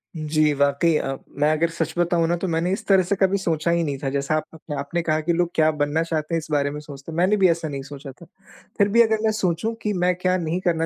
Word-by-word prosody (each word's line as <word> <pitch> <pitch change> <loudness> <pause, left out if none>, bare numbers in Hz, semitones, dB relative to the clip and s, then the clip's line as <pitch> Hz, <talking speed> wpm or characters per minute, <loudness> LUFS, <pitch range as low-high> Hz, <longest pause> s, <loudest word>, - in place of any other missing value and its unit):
जी, 155 -1 +1
वाक़ई 140 +3 +2
अ, 135 -2 -2 0.2
मैं 150 +1 +3
अगर 160 +2 +1
सच 165 -1 -3
बताऊँ 170 -1 +2
ना 170 - +1
तो 185 - -3
मैंने 170 +1 0
इस 195 - -4
तरह 195 -2 +5
से 185 +3 0
कभी 195 0 +2
सोचा 170 -3 -1
ही 170 0 +2
नहीं 145 -3 -2
था 135 - 0
जैसा 140 +2 -1
आप 155 - 0
अपने 155 -1 -7
आपने 140 +5 -2
कहा 155 -2 0
कि 170 +2 0
लोग 175 0 +1
क्या 155 -1 +4
बनना 150 +1 0
चाहते 160 -1 -3
हैं - - +2
इस 160 - -10
बारे 145 -1 +1
में 150 - -6
सोचते 145 0 -10
हैं, 160 - -6
मैंने 185 +5 +3
भी 190 -2 +5
ऐसा 165 -1 0
नहीं 140 -2 -5
सोचा 140 0 -9
था 135 +7 -16 0.5
फिर 200 - +4
भी 235 +3 +5
अगर 220 -1 +3
मैं 220 - +3
सोचूँ 180 +5 0
कि 210 - -1
मैं 180 0 +3
क्या 185 +1 0
नहीं 170 0 -2
करना 165 -3 +1
165 Hz, 275 wpm, -23 LUFS, 150-175 Hz, 0.5 s, तरह